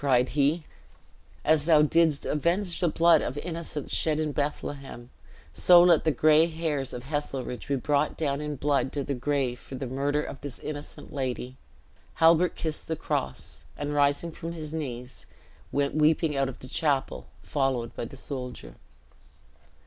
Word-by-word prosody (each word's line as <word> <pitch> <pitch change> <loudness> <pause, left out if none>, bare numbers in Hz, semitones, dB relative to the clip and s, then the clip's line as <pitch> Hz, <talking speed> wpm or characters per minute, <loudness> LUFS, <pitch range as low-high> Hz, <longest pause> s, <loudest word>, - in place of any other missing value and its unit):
cried 125 -2 +3
he; 150 +3 +1 0.8
"as 155 -1 +3
thou 155 -2 +6
didst 160 -1 +2
avenge 170 +4 0
the 175 - +2
blood 165 0 +5
of 130 - -3
innocence 165 -3 -5
shed 155 -1 +1
in 155 -1 0
Bethlehem, 140 -4 -4 0.4
so 175 -1 +7
let 170 -3 +5
the - - +4
gray 155 +3 +5
hairs 155 -5 -2
of 120 - -6
Heselrigge 135 -3 -4
be 140 - +1
brought 145 +3 0
down 145 -2 -1
in 150 -1 -3
blood 140 -1 +1
to 145 - -2
the 140 - -2
grave 130 -1 -1
for 135 - -9
the 135 +1 -4
murder 140 +4 -1
of 135 - -8
this 145 -2 -6
innocent 145 -1 -8
lady!" 130 -2 -3 0.6
Halbert 165 +2 +4
kissed 155 -2 -4
the 160 - -1
cross, 65 - -3
and 145 0 -3
rising 145 +3 +2
from 165 +1 -6
his 155 -2 -7
knees, 130 -5 -6 0.4
went 140 0 0
weeping 155 0 +3
out 135 -1 +1
of 130 - -10
the 130 - -9
chapel, 140 -1 -1 0.2
followed 135 -5 -1
by - - -4
the 135 - -10
soldier. 130 -2 -7
145 Hz, 165 wpm, -27 LUFS, 135-155 Hz, 0.8 s, so